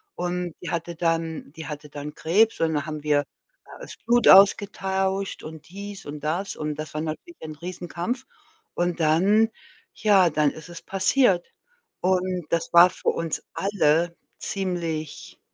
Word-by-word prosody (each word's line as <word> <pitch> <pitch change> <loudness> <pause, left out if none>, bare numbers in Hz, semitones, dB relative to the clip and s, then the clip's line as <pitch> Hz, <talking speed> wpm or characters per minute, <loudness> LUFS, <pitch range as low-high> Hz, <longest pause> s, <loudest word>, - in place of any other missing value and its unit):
Und 180 -1 -3
die 180 - -6
hatte 170 0 -3
dann 165 -3 -2
die 160 -2 -8
hatte 150 -1 -7
dann 145 +1 -7
Krebs, 215 +8 +2
und 160 -1 +2
da 145 +1 -1
haben 155 -1 -6
wir 145 -1 +2 0.4
da - - -16
das - - -8
Blut 240 +1 +3
ausgetauscht 195 0 +4
und 155 -1 -10
dies 200 +1 -8
und 145 +1 -7
das. 170 +6 -2
Und 150 -1 -3
das 155 +1 -7
war 155 - -2
natürlich 160 - -6
ein 155 -1 -7
Riesenkampf. 180 - -5 0.5
Und 175 -1 -1
dann, 195 +8 +3 0.4
ja, 195 -5 +4
dann 150 -1 +2
ist 160 +2 -11
es 170 - -8
passiert. 195 -1 +3 0.5
Und 185 -2 0
das 165 -1 -1
war 175 +1 +9
für - - -2
uns 165 -2 -2
alle 170 -4 +1 0.2
ziemlich 170 -5 -4
170 Hz, 155 wpm, -24 LUFS, 155-190 Hz, 0.5 s, war